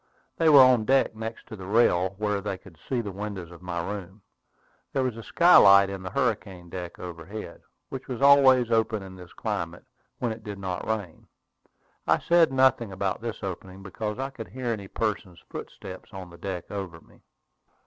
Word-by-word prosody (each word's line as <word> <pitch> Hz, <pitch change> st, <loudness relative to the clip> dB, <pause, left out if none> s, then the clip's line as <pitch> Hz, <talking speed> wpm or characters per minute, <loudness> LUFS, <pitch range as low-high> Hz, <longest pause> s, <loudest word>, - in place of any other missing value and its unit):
They 165 Hz, -, +4 dB
were 145 Hz, -3 st, +9 dB
on 125 Hz, -4 st, +4 dB
deck, 135 Hz, -1 st, +3 dB
next 110 Hz, +1 st, -7 dB
to -, -, -9 dB
the 95 Hz, -3 st, -9 dB
rail, 95 Hz, -4 st, +3 dB
where 105 Hz, -1 st, -1 dB
they 100 Hz, -1 st, -3 dB
could 90 Hz, -4 st, -17 dB
see 125 Hz, -3 st, +1 dB
the 105 Hz, -3 st, -5 dB
windows 95 Hz, -3 st, -6 dB
of 85 Hz, -1 st, -13 dB
my 85 Hz, -1 st, -4 dB
room. 100 Hz, 0 st, -7 dB, 0.7 s
There 135 Hz, -, +1 dB
was 125 Hz, -3 st, -1 dB
a 115 Hz, -, -7 dB
skylight 100 Hz, -, +6 dB
in 95 Hz, -1 st, -6 dB
the 95 Hz, -, -5 dB
hurricane 100 Hz, -7 st, -2 dB
deck 90 Hz, -2 st, -6 dB
overhead, 90 Hz, +2 st, -8 dB, 0.3 s
which 135 Hz, -1 st, -7 dB
was 125 Hz, -3 st, -4 dB
always 135 Hz, -3 st, +6 dB
open 110 Hz, -2 st, +1 dB
in 95 Hz, -1 st, -10 dB
this 90 Hz, -2 st, -12 dB
climate 85 Hz, +1 st, -4 dB, 0.3 s
when 120 Hz, -2 st, -1 dB
it 110 Hz, 0 st, -7 dB
did 105 Hz, -2 st, -6 dB
not 95 Hz, -2 st, -4 dB
rain. 105 Hz, -7 st, -4 dB, 0.8 s
I -, -, +4 dB
said 170 Hz, -3 st, +4 dB
nothing 130 Hz, -4 st, +3 dB
about 95 Hz, +2 st, -2 dB
this 115 Hz, -1 st, -5 dB
opening, 95 Hz, 0 st, -6 dB
because 105 Hz, +3 st, -4 dB
I 135 Hz, +1 st, -3 dB
could 115 Hz, -4 st, -8 dB
hear 130 Hz, -2 st, -5 dB
any 100 Hz, -3 st, -6 dB
person's 100 Hz, -5 st, -3 dB
footsteps 90 Hz, 0 st, -9 dB
on 95 Hz, -2 st, -8 dB
the 85 Hz, -, -13 dB
deck 90 Hz, -2 st, -5 dB
over 95 Hz, -5 st, -5 dB
me. -, -, -23 dB
100 Hz, 190 wpm, -26 LUFS, 95-120 Hz, 0.8 s, were